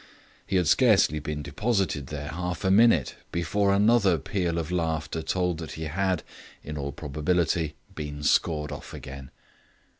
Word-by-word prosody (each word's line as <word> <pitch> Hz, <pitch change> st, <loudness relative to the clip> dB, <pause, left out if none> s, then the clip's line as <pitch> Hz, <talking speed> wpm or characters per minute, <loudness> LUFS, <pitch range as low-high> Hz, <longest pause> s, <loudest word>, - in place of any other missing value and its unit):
He -, -, -1 dB
had 90 Hz, -3 st, +3 dB
scarcely 75 Hz, +1 st, +4 dB
been 75 Hz, 0 st, -4 dB
deposited 90 Hz, -, -1 dB
there 75 Hz, 0 st, -5 dB
half 90 Hz, +2 st, -4 dB
a 95 Hz, -, +3 dB
minute 100 Hz, -, +4 dB
before 100 Hz, +4 st, +1 dB
another 100 Hz, -2 st, +4 dB
peal 85 Hz, +2 st, -2 dB
of 85 Hz, 0 st, -3 dB
laughter 80 Hz, -2 st, -1 dB
told 90 Hz, 0 st, -1 dB
that 80 Hz, -3 st, -6 dB
he 80 Hz, -, -6 dB
had 90 Hz, +3 st, -1 dB, 0.4 s
(in 75 Hz, -, -6 dB
all 70 Hz, -1 st, -3 dB
probability) 80 Hz, +2 st, -1 dB, 0.2 s
been 75 Hz, -1 st, -6 dB
scored 75 Hz, -1 st, +2 dB
off 70 Hz, -, -8 dB
again. 65 Hz, 0 st, -9 dB
80 Hz, 150 wpm, -27 LUFS, 75-90 Hz, 0.4 s, scarcely